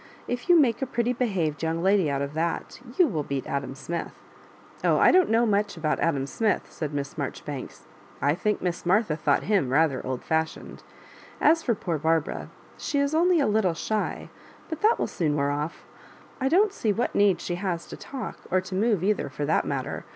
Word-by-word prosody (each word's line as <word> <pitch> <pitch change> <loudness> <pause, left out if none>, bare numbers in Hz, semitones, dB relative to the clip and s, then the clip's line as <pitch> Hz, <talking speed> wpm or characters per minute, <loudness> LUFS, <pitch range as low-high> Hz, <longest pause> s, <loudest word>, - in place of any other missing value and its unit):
If 245 +7 -4
you 350 -1 +7
make 245 -6 +2
a 270 - -1
pretty 240 -1 0
behaved 190 - -1
young 165 +1 -1
lady 190 -4 +3
out 140 0 -1
of 140 +1 -5
that, 165 +2 -2 0.2
you 360 - +6
will 165 - -1
beat 140 -2 -3
Adam 140 -1 -3
Smith." 170 +5 -5 0.4
" - - -25
Oh, - - +4
I - - +6
don't 370 -1 +4
know 230 +2 +3
much 205 -3 0
about 155 -1 0
Adam 140 -5 +1
Smith, 215 +9 -1
said 155 -3 -4
Miss 140 +2 -4
Marjoribanks. 140 -1 -6 0.2
" - - -25
I - - +4
think 210 +4 -1
Miss 175 -1 -2
Martha 185 -2 +2
thought 150 -3 +1
him 195 -11 +1
rather 145 0 +2
old 130 -1 -4
fashioned. 160 0 -2 0.6
As 320 +1 +3
lor 235 - +3
poor 170 -5 -3
Barbara, 160 0 0 0.3
she 295 - -2
is 280 +1 +1
only 345 +2 +4
a 285 - +3
little 210 -5 +2
shy, 215 +5 -3 0.4
but 320 - -5
that 435 +2 +4
will - - 0
soon 155 -4 -1
wear 140 -1 +1
off. 150 +3 -4 0.5
I 265 0 +1
don't 395 +6 +4
see 220 - 0
what 230 +4 -1
need 200 -4 +3
she 175 - -4
has 175 -4 -2
to - - -9
talk 270 -2 -7
— - - -16
or 185 - +3
to 185 +1 -7
move 205 -1 +1
either, 205 -7 +1
for 145 +2 -4
that 155 - +1
matter. - - -3
180 Hz, 210 wpm, -26 LUFS, 150-235 Hz, 0.6 s, you